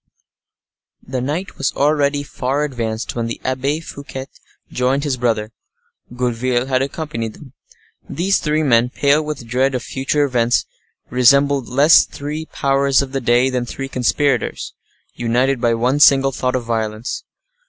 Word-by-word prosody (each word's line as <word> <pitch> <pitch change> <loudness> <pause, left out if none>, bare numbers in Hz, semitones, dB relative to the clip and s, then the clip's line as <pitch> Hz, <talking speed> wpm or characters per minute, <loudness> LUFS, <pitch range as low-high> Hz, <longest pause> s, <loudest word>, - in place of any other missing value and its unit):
The 130 -1 -4
night 155 +9 -4
was 135 - 0
already 145 -1 +1
far 140 +1 -2
advanced 115 -6 -3
when 115 -1 -2
the 115 - -5
Abbe 135 +4 -1
Fouquet 140 -4 -8 0.5
joined 130 +3 0
his 145 -4 0
brother. 115 -3 -1 0.6
Gourville 125 0 0
had 130 -1 0
accompanied 135 -6 -4
him. 135 -4 -14 0.6
These 190 +6 +1
three 155 0 0
men, 120 -3 +3
pale 145 +4 +2
with 150 -5 -5
dread 130 +3 0
of 125 - -3
future 140 +2 0
events, 120 -3 +1 0.5
resembled 140 +2 +3
less 145 +5 +6
three 150 +2 -6
powers 140 -1 +2
of 135 - -8
the 135 0 -2
day 120 +2 +3
than 125 -1 -2
three 135 +3 -5
conspirators, 130 0 0 0.4
united 120 +2 0
by 120 -2 +2
one 125 +5 +1
single 135 -2 +6
thought 125 -1 -1
of 125 - -1
violence. 110 0 -3
130 Hz, 145 wpm, -19 LUFS, 120-140 Hz, 0.6 s, less